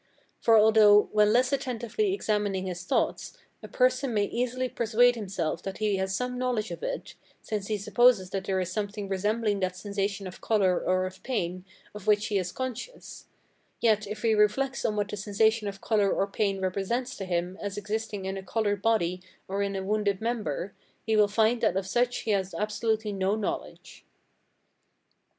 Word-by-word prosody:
For 230 -1 +5
although, 215 -1 +6
when 210 0 +4
less 250 +4 +3
attentively 265 - -1
examining 205 - -1
his 180 -1 -5
thoughts, - - -1 0.2
a - - -8
person 255 -1 +1
may 205 - +3
easily 250 +4 -1
persuade 240 +1 +3
himself 185 -8 -3
that 195 0 -6
he 210 -2 0
has 190 0 -1
some 250 +3 -3
knowledge 245 -4 -1
of - - -6
it, - - -4 0.3
since 210 -2 -3
he 215 - -1
supposes 210 -2 +3
that 195 -1 -3
there 190 -1 0
is 185 -1 -2
something 205 0 -3
resembling 205 +2 0
that 185 -1 -1
sensation 200 0 -3
of 185 - -9
colour 195 -5 +2
or 185 0 +1
of 185 0 -8
pain 185 -7 -3 0.3
of 210 0 -10
which 210 0 +4
he 205 -2 +1
is 180 -1 -3
conscious; 260 - -7 0.5
yet, 215 -2 +2
if 210 +2 -6
he 225 -1 +3
reflects 220 +6 +2
on 215 - +1
what 205 -1 -1
the 210 - -5
sensation 215 +2 +1
of 195 -1 -6
colour 205 -3 +2
or 195 - +1
pain 195 -1 -1
represents 200 +7 -2
to 195 - -5
him 175 0 -2
as 205 -1 -4
existing 210 -1 -3
in 190 0 -3
a 190 - -6
coloured 205 0 -1
body 185 -6 +1 0.3
or 195 +1 -2
in 200 0 -1
a 190 - -3
wounded 205 -1 0
member, 210 -6 -3 0.3
he 220 -1 +1
will 210 -1 +5
find 220 +3 +2
that 215 -5 +2
of 195 - -1
such 240 +5 0
he 220 - -2
has 190 -2 -1
absolutely 215 0 -1
no 195 +1 0
knowledge. 215 -2 -5
210 Hz, 185 wpm, -28 LUFS, 195-225 Hz, 0.5 s, although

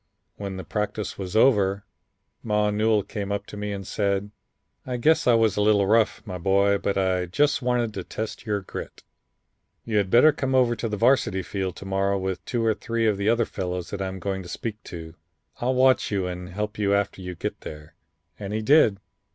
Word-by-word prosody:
When 100 -2 -5
the 95 - -6
practice 105 0 -3
was 95 0 -5
over, 100 -5 +3 0.6
Ma 105 -1 +1
Newell 105 0 +2
came 100 0 -5
up 100 - -2
to - - -10
me 105 0 -4
and 100 -1 -5
said: 100 0 -1 0.6
'I 125 -1 -2
guess 155 +5 +3
I 120 - +6
was 115 -1 +3
a - - +2
little 105 -1 +4
rough, 110 +1 +2
my 90 -4 -6
boy, 100 +2 +3
but 100 - -1
I 95 -2 +1
just 145 +12 +2
wanted 120 -3 0
to 95 - -5
test 110 +4 -5
your 105 -3 -1
grit. 95 - -8 0.8
You 110 -2 0
had 100 -2 +1
better 125 +9 +7
come 135 -2 -1
over 125 -2 +4
to 115 0 -3
the 105 - -3
Varsity 100 -5 +2
field 95 0 -3
to - - -10
morrow 95 +1 0
with 95 -1 -3
two 120 -3 -1
or 110 - +3
three 115 +1 -2
of 105 -3 +2
the 100 +2 +1
other 115 0 +3
fellows 90 -3 -4
that 100 - -4
I 95 - -1
am 95 0 -5
going 95 +1 -3
to 90 - -10
speak 110 +4 -5
to. 80 -2 -8 0.4
I'll 130 +2 0
watch 130 0 +4
you 100 -3 -1
and 90 0 -5
help 105 +3 -4
you 100 -1 +2
after 100 -1 -1
you 90 -1 -6
get - - -5
there.' 75 0 -9 0.5
And 100 0 -5
he 110 - -2
did. 130 -6 +5
100 Hz, 215 wpm, -25 LUFS, 95-110 Hz, 0.8 s, better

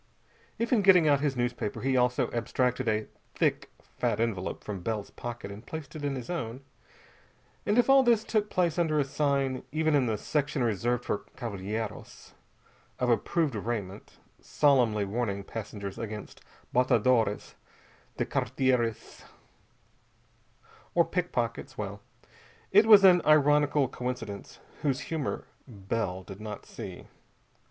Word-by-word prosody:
If 230 +2 0
in 225 - +4
getting 185 -5 +6
out 145 -2 +4
his 140 -2 0
newspaper 120 -3 -2
he 135 0 +1
also 125 0 +2
abstracted 125 +1 -1
a 110 -1 +1 0.3
thick - - 0 0.3
fat 105 - 0
envelope 110 -5 -2
from 100 -3 -5
Bell's 105 +2 -3
pocket 120 -4 -7
and 100 +3 -9
placed 160 -1 -8
it 150 - -6
in 140 -1 -1
his 125 -3 -6
own, 130 -8 -4 1.1
and 210 - +2
if 245 - +4
all 270 0 +7
this 235 -4 +3
took 210 -2 0
place 175 -1 +1
under 160 -3 +2
a 145 - +4
sign 140 -2 0
even 155 +1 +1
in 135 -4 +3
the 110 -2 0
section 140 +1 -1
reserved 120 +2 0
for - - -2
cavalhieros 110 -2 -5 0.6
of 125 -1 +1
approved 150 +5 +1
raiment 105 -3 -5 0.2
solemnly 120 -8 +3
warning 100 -1 -2
passengers 100 -2 -6
against 105 -2 -7 0.3
"batadores 120 -4 +2 0.6
de - - 0
carteiras," 125 -4 -1 1.7
or 170 -1 +5
pickpockets 165 -10 -2
well, 100 -1 -5 0.7
it 210 +3 +6
was 210 -3 +9
an 180 -2 +7
ironical 145 -1 +4
coincidence 120 -5 -6 0.2
whose 140 -2 0
humor 155 -4 -2 0.2
Bell 100 -4 -3
did 95 +2 -10
not 105 -1 -7
see. - - -9
125 Hz, 135 wpm, -29 LUFS, 110-150 Hz, 1.7 s, was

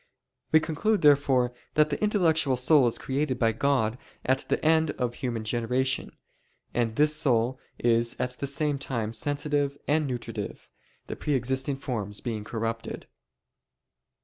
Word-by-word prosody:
We 160 - +7
conclude 195 +7 0
therefore 135 -4 +4 0.2
that 150 0 +4
the - - -2
intellectual 165 - +2
soul 130 +1 +5
is 115 - +1
created 135 -1 -1
by 115 -2 +3
God 120 -1 +1 0.3
at 130 +1 +3
the - - +1
end 160 0 +4
of 120 -1 -1
human 120 -3 -3
generation, 125 +4 -1 0.6
and 115 -2 0
this 150 +2 +3
soul 130 -4 +1 0.2
is 115 0 +2
at 125 0 -3
the 140 - -2
same 145 0 -1
time 115 -5 -2
sensitive 145 +3 -1
and 150 0 +2
nutritive, 115 - -6 0.3
the - - -5
pre 150 - -1
existing 130 +2 -1
forms 105 -7 -4
being 110 -4 -4
corrupted. 115 +1 -4
130 Hz, 145 wpm, -27 LUFS, 120-145 Hz, 0.6 s, We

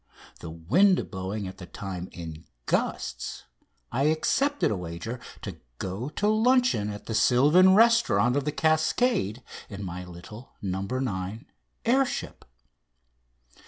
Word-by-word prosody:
the - - -7
wind 140 - +2
blowing 95 +2 -4
at 95 - -9
the 90 - -9
time 95 -3 -6
in 80 -2 -8 0.2
gusts, - - -2 0.5
I 135 +3 +1
accepted 275 - +1
a - - 0
wager 90 +7 -6 0.2
to - - -6 0.2
go 100 - -4
to 205 +7 -1
luncheon 225 - +3
at 105 0 -7
the 115 - -4
sylvan 150 - +5
restaurant 230 - +4
of 145 - +1
"The 150 - 0
Cascade" 155 - +1 0.3
in 100 -1 -7
my 90 -1 -5
little 90 +7 -11
"No. 95 -1 -3
9" 110 0 -3 0.4
air 260 +4 +4
ship. - - -6
115 Hz, 130 wpm, -27 LUFS, -, 0.5 s, sylvan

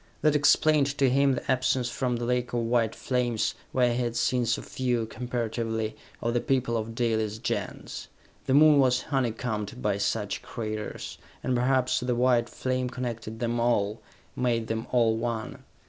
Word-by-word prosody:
That 155 -1 +4
explained 150 0 +4
to 135 -2 +3
him 140 +1 +4
the 125 - -2
absence 130 -1 +1
from 125 -1 -1
the 120 0 -3
lake 125 0 -1
of 120 - +1
white 115 -1 +1
flames, 125 -4 0 0.2
where 125 -2 +2
he 125 - -1
had 120 -1 -2
seen 120 0 +1
so 110 - 0
few, 125 -3 -1
comparatively, 115 -2 -3 0.3
of 115 - 0
the 120 - +1
people 130 -3 0
of 115 0 -3
Dalis' 110 -3 0
Gens. 115 - -4 0.4
The 130 - +3
Moon 150 0 +7
was 130 -1 +3
honeycombed 120 -4 -2
by 105 -4 0
such 105 0 -1
craters, 110 -2 -5 0.2
and 130 - 0
perhaps 130 +1 +2
the 125 0 -1
white 120 -1 +3
flame 130 -1 -2
connected 115 -3 -5
them 120 0 -1
all, 110 -3 +1 0.3
made 120 -2 0
them 110 0 -3
all 115 -3 +3
one. 115 -1 -4
120 Hz, 165 wpm, -27 LUFS, 115-130 Hz, 0.4 s, Moon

